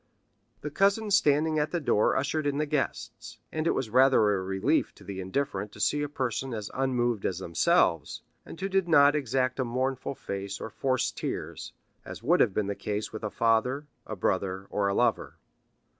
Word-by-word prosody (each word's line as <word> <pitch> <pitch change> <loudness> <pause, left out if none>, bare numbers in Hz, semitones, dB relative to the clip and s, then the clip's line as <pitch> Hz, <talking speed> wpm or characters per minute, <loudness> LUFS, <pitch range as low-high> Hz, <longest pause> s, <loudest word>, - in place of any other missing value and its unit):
The 150 - -5
cousin 200 +5 +2
standing 155 -4 +3
at 150 - 0
the 175 - -1
door 110 -8 +2
ushered 145 +2 -1
in 140 0 -1
the 150 - +1
guests, 145 -2 -3
and 155 +1 -2
it - - +2
was 115 -5 -3
rather 130 -4 +5
a 95 - -1
relief 95 0 0
to - - -16
the 95 -1 -6
indifferent 100 0 -3
to - - -13
see 145 +8 +1
a 145 - -2
person 130 -2 -3
as 105 -2 -6
unmoved 120 -5 0
as 90 - -1
themselves, 85 -2 +1 0.2
and - - -11
who 195 - -2
did 195 -2 +1
not 145 -3 +6
exact 130 -2 0
a - - +2
mournful 130 +2 -2
face 100 -2 -5
or 110 - -6
force 130 +1 0
tears, - - -5 0.3
as - - -9
would 170 +8 +3
have 110 - +4
been 105 +2 -1
the 100 - -2
case 105 +2 -4
with 110 - -7
a 105 - -1
father, 115 +6 +1 0.2
a 110 - -4
brother, 95 0 -1
or 100 -1 0
a 100 - 0
lover. - - +1
130 Hz, 195 wpm, -28 LUFS, 105-145 Hz, 0.3 s, not